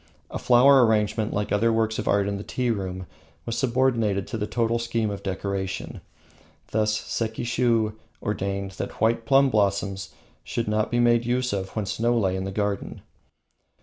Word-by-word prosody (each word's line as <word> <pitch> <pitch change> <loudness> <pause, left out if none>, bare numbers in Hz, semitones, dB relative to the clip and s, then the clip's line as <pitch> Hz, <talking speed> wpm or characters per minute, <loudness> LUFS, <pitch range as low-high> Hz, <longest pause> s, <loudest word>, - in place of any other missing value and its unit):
A - - -4
flower 130 +2 +6
arrangement, 110 -1 +1
like 105 0 -2
the - - +2
other 115 +3 +2
works 110 0 0
of 110 - -4
art 100 -1 +2
in 100 0 -2
the 100 - -6
tea 125 +1 -1
room, 95 -3 -4 0.4
was 115 - -3
subordinated 115 -5 +1
to 115 - -3
the 105 - -2
total 115 0 0
scheme 115 -2 -1
of 100 -1 -6
decoration. 95 0 -4 0.7
Thus 110 0 +1
Sekishiu 115 -1 0 0.3
ordained 100 -1 -3
that - - -6
white 115 0 +1
plum 135 +1 +5
blossoms 100 -2 0 0.3
should 115 - -3
not 105 0 0
be 120 - 0
made 120 0 +3
use 125 0 0
of 95 -1 -4
when 110 -2 -1
snow 120 +5 0
lay 95 -4 +1
in 95 0 -3
the 95 - -4
garden. 100 0 -3
110 Hz, 175 wpm, -25 LUFS, 100-115 Hz, 0.7 s, flower